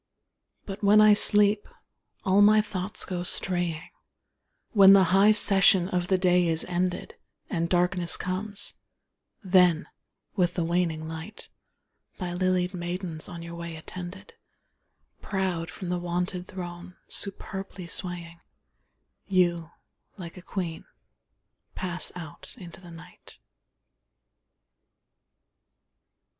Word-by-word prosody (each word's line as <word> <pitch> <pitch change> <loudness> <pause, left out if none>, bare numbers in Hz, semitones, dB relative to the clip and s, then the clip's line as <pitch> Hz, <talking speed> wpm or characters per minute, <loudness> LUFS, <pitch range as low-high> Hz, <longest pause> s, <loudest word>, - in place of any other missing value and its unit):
But 195 +1 -8
when 205 +1 +6
I 215 0 +7
sleep, 205 0 +3
and - - -24 0.5
all 195 +2 +4
my 215 +1 +6
thoughts 195 -2 -2
go 180 -2 -4
straying, 175 -2 -2 0.8
When 195 -2 +8
the 195 -1 +7
high 195 +2 +6
session 195 -3 +5
of 180 -2 -1
the 190 - +2
day 180 -1 +3
is 160 -1 0
ended, 180 0 -2 0.4
And 170 -1 -1
darkness 180 -1 0
comes; 200 +3 -4 0.7
then, 180 -4 +4 0.5
with 175 -2 +1
the 175 - 0
waning 165 -2 -1
light, 160 +6 -8 0.7
By 180 -2 -4
lilied 185 0 0
maidens 175 -2 -4
on 170 -1 -8
your 170 0 -8
way 170 -1 -7
attended, 180 - -9 0.9
Proud 185 -4 -2
from 185 - -7
the 180 0 -1
wonted 180 +1 -3
throne, 180 0 -8
superbly 195 -1 -5
swaying, 170 -1 -4 0.9
You, 175 -4 +1 0.5
like 170 -3 -9
a 180 - -10
queen, 175 -3 -5 0.9
pass 180 -1 -3
out 160 -4 -10
into 175 -1 -11
the 175 - -13
night. 170 +1 -14
180 Hz, 115 wpm, -27 LUFS, 175-190 Hz, 0.9 s, When